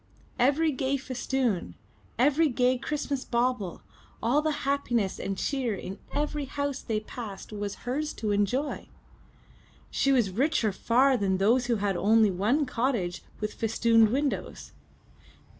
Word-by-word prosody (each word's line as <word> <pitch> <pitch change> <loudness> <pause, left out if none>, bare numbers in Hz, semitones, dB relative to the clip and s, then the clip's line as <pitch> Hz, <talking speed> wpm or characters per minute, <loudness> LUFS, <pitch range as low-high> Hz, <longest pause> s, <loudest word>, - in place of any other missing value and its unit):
Every 290 +6 +3
gay 270 0 0
festoon, 255 -6 -2 0.4
every 295 +5 +4
gay 250 0 +2
Christmas 285 -1 -2
bauble, 235 -6 -1 0.4
all 255 +6 +2
the 305 -2 -2
happiness 240 -8 0
and 195 -1 -3
cheer 255 -4 -1
in 190 +1 -7
every 295 -1 -2
house 285 0 -3
they 215 -2 -2
passed 215 -2 -8
was 205 -1 -4
hers 295 +5 -1
to 215 -2 -2
enjoy! 225 +8 0 1.0
She 275 - +2
was 240 -8 +3
richer 240 0 +1
far 255 +7 +3
than 195 -3 +1
those 235 +6 +3
who 240 - +2
had 200 -2 0
only 215 +2 +4
one 220 - +1
cottage 230 -8 -1 0.2
with 210 0 -3
festooned 225 0 +3
windows! 280 +4 -2
245 Hz, 135 wpm, -28 LUFS, 210-275 Hz, 1.0 s, every